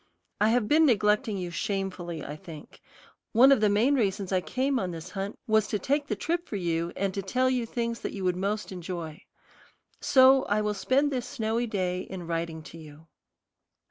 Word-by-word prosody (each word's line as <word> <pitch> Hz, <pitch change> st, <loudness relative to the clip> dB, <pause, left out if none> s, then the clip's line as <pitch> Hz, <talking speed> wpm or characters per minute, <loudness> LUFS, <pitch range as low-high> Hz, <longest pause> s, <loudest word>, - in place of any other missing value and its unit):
I 210 Hz, -, +4 dB
have 230 Hz, -2 st, +2 dB
been 310 Hz, +4 st, +5 dB
neglecting 210 Hz, -1 st, +2 dB
you 180 Hz, -2 st, -4 dB
shamefully, 185 Hz, -5 st, -3 dB
I 145 Hz, -, -6 dB
think. 155 Hz, -1 st, -12 dB, 0.5 s
One 255 Hz, +4 st, +7 dB
of 270 Hz, -6 st, +4 dB
the 210 Hz, -, +4 dB
main 220 Hz, +8 st, +3 dB
reasons 200 Hz, -6 st, 0 dB
I 185 Hz, -1 st, +2 dB
came 260 Hz, +5 st, -1 dB
on 185 Hz, -, -2 dB
this 170 Hz, +1 st, -7 dB
hunt 195 Hz, +1 st, -4 dB
was 220 Hz, -1 st, +2 dB
to 210 Hz, -, -1 dB
take 285 Hz, +8 st, -1 dB
the 215 Hz, -, -1 dB
trip 340 Hz, -, -2 dB
for -, -, -4 dB
you, 170 Hz, -2 st, -1 dB
and 195 Hz, -1 st, -1 dB
to 195 Hz, -, -2 dB
tell 255 Hz, +7 st, +1 dB
you 245 Hz, -3 st, -1 dB
things 235 Hz, 0 st, -3 dB
that -, -, -4 dB
you 195 Hz, -, -5 dB
would 180 Hz, -1 st, +1 dB
most 200 Hz, +3 st, -2 dB
enjoy. 175 Hz, -3 st, -6 dB, 0.8 s
So 265 Hz, 0 st, +5 dB
I 205 Hz, +1 st, +1 dB
will 210 Hz, 0 st, 0 dB
spend 265 Hz, +8 st, +1 dB
this 250 Hz, -3 st, -2 dB
snowy 225 Hz, +2 st, -1 dB
day 185 Hz, -4 st, -1 dB
in 185 Hz, -2 st, -7 dB
writing 165 Hz, -1 st, -3 dB
to 165 Hz, -, -11 dB
you. 155 Hz, +1 st, -14 dB
205 Hz, 200 wpm, -27 LUFS, 180-240 Hz, 0.8 s, One